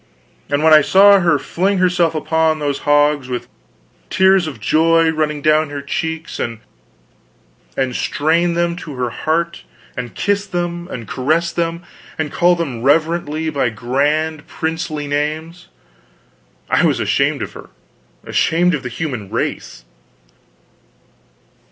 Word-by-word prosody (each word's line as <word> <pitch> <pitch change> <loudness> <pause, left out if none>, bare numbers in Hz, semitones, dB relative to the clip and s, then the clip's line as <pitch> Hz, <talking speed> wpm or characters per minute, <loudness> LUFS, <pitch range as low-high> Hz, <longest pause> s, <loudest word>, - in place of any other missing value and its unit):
And 145 +1 0
when 160 0 +6
I 155 - +8
saw 200 +6 +6
her 170 -4 +3
fling 190 +8 -1
herself 180 -3 +2
upon 160 0 +1
those 145 -2 -2
hogs, 145 -2 +2
with 125 -1 -4 0.6
tears 190 -2 +4
of 150 - -7
joy 165 +1 +3
running 150 -2 -2
down 155 0 +3
her 145 -1 -6
cheeks, 160 +3 -4
and 115 -1 -3 1.4
strain 170 +3 +1
them 170 0 0
to 155 -5 -8
her 125 -2 -2
heart, 170 +5 -2 0.3
and 125 -2 -6
kiss 205 0 0
them, 175 -1 -3
and 115 - -7
caress 160 +6 0
them, 170 0 -2 0.3
and 155 -2 -2
call 175 0 +3
them 140 -9 -4
reverently 155 +2 +1
by 140 -4 0
grand 145 +7 -1
princely 160 -2 -3
names, 155 +4 -3 1.0
I - - +2
was - - +2
ashamed - - +1
of - - -7
her, - - -12 0.5
ashamed 175 +2 +1
of 150 - -1
the 125 - -5
human 125 -7 -5
race. - - -4
155 Hz, 135 wpm, -18 LUFS, 145-170 Hz, 1.4 s, I